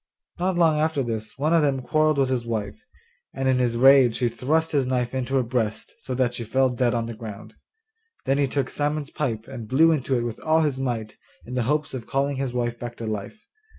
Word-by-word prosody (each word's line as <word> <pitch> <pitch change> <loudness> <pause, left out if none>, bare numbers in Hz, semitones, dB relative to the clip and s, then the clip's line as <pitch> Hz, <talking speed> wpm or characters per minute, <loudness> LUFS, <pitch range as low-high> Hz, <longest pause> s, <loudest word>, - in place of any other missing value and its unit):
Not 185 +1 0
long 160 -3 +4
after 155 -3 +1
this 110 -3 -5
one 150 +4 +1
of 165 - +5
them 135 -3 0
quarrelled 155 +1 +2
with 135 -2 +2
his 125 -2 0
wife, 110 -4 -4 0.5
and 135 0 -1
in 130 -1 +3
his 120 -2 +1
rage 130 -2 +6
he 120 -2 +1
thrust 155 +8 0
his 140 -4 +1
knife 125 -1 -1
into 130 0 -2
her 130 - +3
breast 115 -3 -2
so 130 - -5
that 125 -1 +1
she 120 - -4
fell 130 +4 +2
dead 120 -1 +1
on 115 -1 -1
the 115 - -5
ground. 110 -3 -9 0.7
Then 135 +1 +1
he 140 - +3
took 135 0 -2
Simon's 150 0 -2
pipe 115 -8 -3
and 120 -5 -8
blew 160 +7 +5
into 135 -4 0
it 120 - -1
with 120 -2 -4
all 160 +1 +2
his 145 -4 0
might, 115 -5 -3 0.3
in 125 - -8
the 125 - 0
hopes 150 -1 0
of 125 -3 -6
calling 140 0 0
his 135 -2 -2
wife 120 -1 -2
back 120 -1 -7
to 115 - -5
life. 110 - -5
130 Hz, 230 wpm, -24 LUFS, 120-145 Hz, 0.7 s, rage